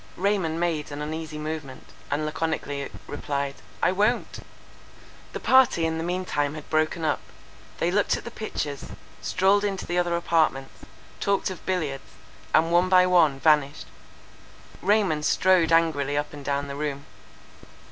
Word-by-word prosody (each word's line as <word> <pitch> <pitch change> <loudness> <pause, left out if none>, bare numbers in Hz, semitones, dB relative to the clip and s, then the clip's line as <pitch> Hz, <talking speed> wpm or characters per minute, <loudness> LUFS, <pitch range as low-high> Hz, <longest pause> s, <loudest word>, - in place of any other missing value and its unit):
—Raymond 185 -4 0
made 165 -4 -1
an 145 - -6
uneasy 155 +1 -5
movement, 150 -3 -6 0.2
and 145 +2 -1
laconically 155 -3 -3 0.2
replied—"I 140 +3 -3
won't!" 210 +6 0 0.9
The - - -4
party 260 -10 +4
in 160 0 -1
the - - -2
mean 180 +2 -2
time 145 -3 -1
had 155 - -9
broken 155 +1 +1
up. 155 - +1 0.6
They 170 - 0
looked 205 +2 +2
at - - -9
the 235 - -7
pictures, 150 - -4 0.4
strolled 195 +2 +2
into 195 -2 -2
the 175 +1 0
other 175 -1 +1
apartments, 160 -6 0 0.3
talked 200 -1 0
of 180 - -9
billiards, 155 -8 -3 0.4
and 165 +1 +3
one 175 +2 +4
by 185 -1 +6
one 165 -7 +4
vanished. 150 -2 +2 1.0
Raymond 190 -6 +2
strode 180 0 +3
angrily 150 -4 +2
up 145 0 -2
and 145 -1 -9
down 140 0 -1
the 140 - -6
room. 145 -1 -4
160 Hz, 145 wpm, -25 LUFS, 145-180 Hz, 1.0 s, by